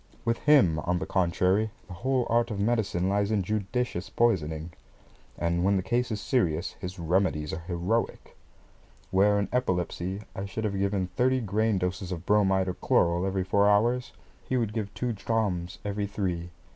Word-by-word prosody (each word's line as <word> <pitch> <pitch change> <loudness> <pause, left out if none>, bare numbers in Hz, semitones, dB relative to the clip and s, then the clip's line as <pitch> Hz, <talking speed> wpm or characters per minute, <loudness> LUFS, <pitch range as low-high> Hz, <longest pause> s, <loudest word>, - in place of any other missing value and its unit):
With 115 0 +1
him, 130 - +5
on 90 +3 0
the 95 - -3
contrary, 95 +3 +1 0.2
the 95 - -10
whole 130 +6 0
art 115 +1 +2
of 105 -3 -4
medicine 105 -4 +1
lies 100 +1 +1
in 105 -3 +1
judicious 105 0 -2
poisoning, 80 -8 0 0.7
and 85 +1 0
when 100 +1 +3
the 95 - -1
case 125 +3 0
is 110 -2 -2
serious, 85 - 0
his 90 0 -6
remedies 85 -3 0
are - - -3
heroic. 90 +6 -2 0.8
Where, 100 +2 +4
in 100 -2 0
epilepsy, 95 -4 -1
I 95 - -4
should 100 +3 -5
have 105 -2 -1
given 100 -1 0
thirty 130 +1 +3
grain 110 -1 +1
doses 90 0 -2
of 90 -1 -5
bromide 95 -2 +3
or 90 - -1
chloral 85 +2 +2
every 95 -1 0
four 100 +2 +3
hours, 120 +5 +2 0.3
he 130 - -1
would 115 -4 -1
give 105 -2 -3
two 125 -1 -1
drachms 100 -5 -1
every 100 0 -2
three. 90 -4 -3
100 Hz, 170 wpm, -28 LUFS, 90-110 Hz, 0.8 s, him